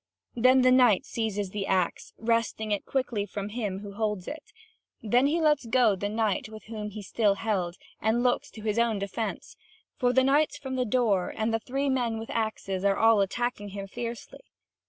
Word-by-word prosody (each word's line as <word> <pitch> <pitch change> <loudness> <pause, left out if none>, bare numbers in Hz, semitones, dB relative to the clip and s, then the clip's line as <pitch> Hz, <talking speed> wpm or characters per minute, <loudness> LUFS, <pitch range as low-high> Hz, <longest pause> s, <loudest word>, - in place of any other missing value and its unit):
Then 255 +2 +5
the 255 - +5
knight 245 -6 +5
seizes 210 -4 -3
the 200 -1 -3
axe, 185 -2 0
wresting 225 -1 0
it 205 - -1
quickly 235 -6 -1
from 205 0 -5
him 205 -4 -3
who 200 -1 -8
holds 210 -3 -2
it; 320 +8 -8 0.5
then 245 +5 +3
he 320 +4 +1
lets 300 -6 +2
go 230 -3 +4
the 205 +2 -3
knight 215 -1 0 0.2
whom 215 -1 -5
he 210 0 -8
still 205 +1 +1
held, 195 -5 -1 0.3
and 225 +3 +1
looks 255 +3 +1
to 215 - -11
his 215 +1 0
own 230 -2 +2
defence; 200 +3 -4 0.4
for 245 -1 +2
the 260 +1 +4
knights 285 +3 +2
from 265 -1 -5
the 250 -1 0
door, 210 -6 +1
and 220 0 0
the 225 - +1
three 270 +5 -2
men 245 -4 0
with 225 0 -6
axes 215 -4 -2
are 200 -1 +3
all 225 -2 +5
attacking 205 +1 -2
him 200 0 -6
fiercely. 235 +4 -6
225 Hz, 190 wpm, -28 LUFS, 205-245 Hz, 0.5 s, Then